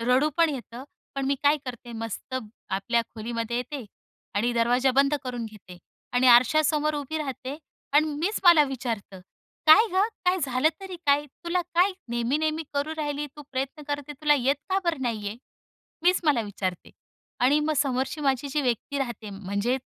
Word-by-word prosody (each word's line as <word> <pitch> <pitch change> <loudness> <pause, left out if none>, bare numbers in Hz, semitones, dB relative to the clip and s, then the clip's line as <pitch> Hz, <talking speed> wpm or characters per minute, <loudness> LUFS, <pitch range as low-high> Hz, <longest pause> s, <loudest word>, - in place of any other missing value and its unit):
रडू 250 +5 +3
पण 335 -1 +5
येतं, 255 -2 -7 0.3
पण 275 -1 -2
मी 280 - +2
काय 290 +1 +5
करते 240 -2 -7
मस्त 225 +3 -6 0.4
आपल्या 230 +5 +1
खोलीमध्ये 230 +1 -3
येते 255 +1 -4 0.5
आणि 235 +4 +1
दरवाजा 245 +3 +3
बंद 275 +2 +4
करून 245 -2 -4
घेते. 200 -5 -13 0.3
आणि 250 +1 +3
आरशासमोर 300 +5 +4
उभी 295 +2 -3
राहते 270 -1 -5 0.4
आणि 305 +2 +5
मीच 390 +7 -1
मला 340 -4 +8
विचारते, 230 -8 -5 0.5
"काय 370 +9 +8
गं, 390 +3 +3 0.2
काय 360 +1 +3
झालं 260 +3 +2
तरी 380 -2 -7
काय? 285 +1 +4 0.2
तुला 350 +1 0
काय 370 +3 +4 0.2
नेहमी, 240 +4 0
नेहमी 315 +1 0
करू 285 +2 -1
राहिली 295 -1 -2
तू 295 - -9
प्रयत्न 275 +3 -3
करते 290 0 -3
तुला 300 -1 +5
येत 275 0 +2
का 380 - +3
बरं 325 -6 0
नाहीये?" 220 -3 -2 0.7
मीच 360 +2 +4
मला 290 -6 +3
विचारते 190 -3 -4 0.5
आणि 280 +4 +5
मग 310 +1 0
समोरची 270 +2 0
माझी 275 -1 0
जी 295 +2 0
व्यक्ती 255 +3 -1
राहते, 240 -5 -4
म्हणजे 200 +5 -1
270 Hz, 165 wpm, -26 LUFS, 235-300 Hz, 0.7 s, मला